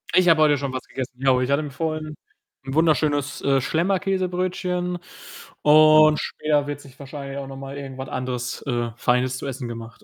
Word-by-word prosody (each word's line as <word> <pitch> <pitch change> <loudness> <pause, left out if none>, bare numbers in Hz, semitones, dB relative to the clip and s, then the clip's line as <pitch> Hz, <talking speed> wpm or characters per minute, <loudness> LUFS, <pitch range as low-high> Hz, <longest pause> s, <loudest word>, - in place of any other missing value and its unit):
Ich 185 -1 +5
habe 160 -2 +5
heute 150 -1 +5
schon 140 -1 -3
was 130 - -4
gegessen, 130 -1 -5
genau. 130 -1 +3
Ich 130 +2 -1
hatte 140 +2 +2
mir 145 - -6
vorhin 155 +1 -3 0.5
'n 135 - -5
wunderschönes, 145 -2 +1
äh, 135 -1 +2
Schlemmer-Käsebrötchen 180 +1 -1 0.6
und 155 0 +6
später 150 -2 0
wird 145 0 -5
sich 135 -2 -16
wahrscheinlich 140 0 -7
auch 140 -1 -5
noch 135 0 -8
mal 135 +1 -7
irgendwas 135 -1 -7
anderes, 125 -1 -4
äh, 120 -3 -1
Feines 125 +1 +1
zu - - -7
essen 130 -2 -5
gemacht. 115 -1 -9
140 Hz, 180 wpm, -23 LUFS, 130-155 Hz, 0.6 s, und